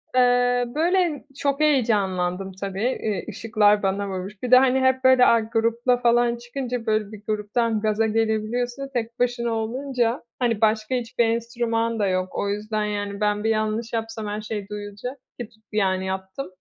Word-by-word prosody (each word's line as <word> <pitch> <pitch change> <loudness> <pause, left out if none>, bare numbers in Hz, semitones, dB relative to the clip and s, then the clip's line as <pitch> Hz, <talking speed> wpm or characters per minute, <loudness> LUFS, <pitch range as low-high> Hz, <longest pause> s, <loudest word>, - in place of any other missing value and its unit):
Eee, 245 0 +3
böyle, 340 -1 +1 0.2
çok 280 0 0
heyecanlandım 195 -10 +1
tabii, 200 +6 -1
iii, 210 -3 -2
ışıklar 210 -2 +2
bana 195 +1 0
vurmuş. 190 +3 -6
Bir 250 - -2
de, 255 - +10
hani, 260 0 +4
hep, 260 0 +2
böyle, 260 -1 +6
a, 230 - +5
grupla 230 +2 +1
falan 240 0 +3
çıkınca, 240 0 -5
böyle, 215 -1 0
bir 215 -2 -10
gruptan 215 +1 0
gaza 215 +1 +1
gelebiliyorsun, 225 +4 -1
tek 235 0 -3
başına 240 -1 0
olunca, 240 +2 -1 0.2
hani, 235 -4 0
başka 220 +2 +2
hiçbir 240 -1 0
enstrüman 230 0 -1
da 205 - +2
yok. 185 0 0
O 200 - -1
yüzden, 210 +1 -2
yani, 205 -1 -3
ben 210 0 +1
bir 220 - +1
yanlış 220 +1 -1
yapsam 225 -1 -3
her 210 +1 -3
şey 210 -2 -5
duyulacak, 210 +5 -6 0.2
ki 240 -3 -5
tut 220 -1 -27
yani 190 -3 +1
yaptım. 190 +6 -4
225 Hz, 165 wpm, -24 LUFS, 210-245 Hz, 0.2 s, de